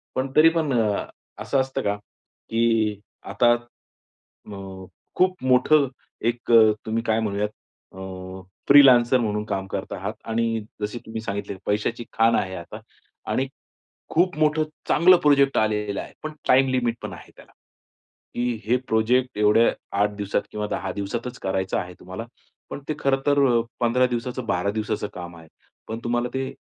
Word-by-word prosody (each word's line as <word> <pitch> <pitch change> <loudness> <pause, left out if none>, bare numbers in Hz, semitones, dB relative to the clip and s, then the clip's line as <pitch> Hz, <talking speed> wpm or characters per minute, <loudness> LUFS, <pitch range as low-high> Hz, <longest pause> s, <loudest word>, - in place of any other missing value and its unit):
पण 130 +1 -1
तरीपण 160 -1 +4
अ, 105 -2 0 0.4
असं 140 - 0
असतं 135 0 -3
का? 100 0 0
की 110 +1 -2 0.3
आता 120 -1 +4 0.7
अ, 100 - -13 0.6
खूप 185 -4 +1
मोठं 130 +3 +4 0.4
एक 120 0 -2
अ, 110 -2 +7
तुम्ही 115 +1 -1
काय 110 -1 +1
म्हणूयात 105 -1 -1 0.5
अ, 95 0 -8 0.3
फ्रीलान्सर 130 -3 +7
म्हणून 105 -2 -1
काम 95 -2 -3
करत - - -5
आहात 100 +3 -4 0.2
आणि 115 0 0 0.2
जसे 105 +3 -3
तुम्ही 110 0 -5
सांगितले 100 -2 -4
पैशाची 105 +3 -1
खाण 115 0 +3
आहे 95 -1 -1
आता 85 -2 -8 0.5
आणि 135 - 0 0.6
खूप 175 +1 +2
मोठं 155 0 +3 0.3
चांगलं 180 +4 +6
प्रोजेक्ट 140 -1 +4
आलेला 105 -2 0
आहे. - - -12
पण 155 - -5 0.2
टाईम 135 +1 +5
लिमिट 120 -3 +1
पण - - -5
आहे - - -12
त्याला, - - -17 0.8
की 120 0 0
हे 120 +3 +3
प्रोजेक्ट 120 +2 +1
एवढ्या 105 +2 +5 0.3
8 105 - +2
दिवसात 100 -1 -1
किंवा 105 0 -3
10 95 -1 -3
दिवसातचं 115 +5 -4
करायचं 95 0 -1
आहे 90 0 -5
तुम्हाला 95 +5 -7 0.5
पण - - -6
ते 155 - 0
खरंतर 140 +1 +2 0.4
15 125 +1 +3
दिवसाचं, 125 0 -4
12 100 -1 0
दिवसाचं 105 -1 -2
काम 85 -1 -8
आहे. 80 -1 -15 0.4
पण 110 - -4
तुम्हाला 120 +1 0
ते 130 0 -2
115 Hz, 150 wpm, -24 LUFS, 105-130 Hz, 0.8 s, अ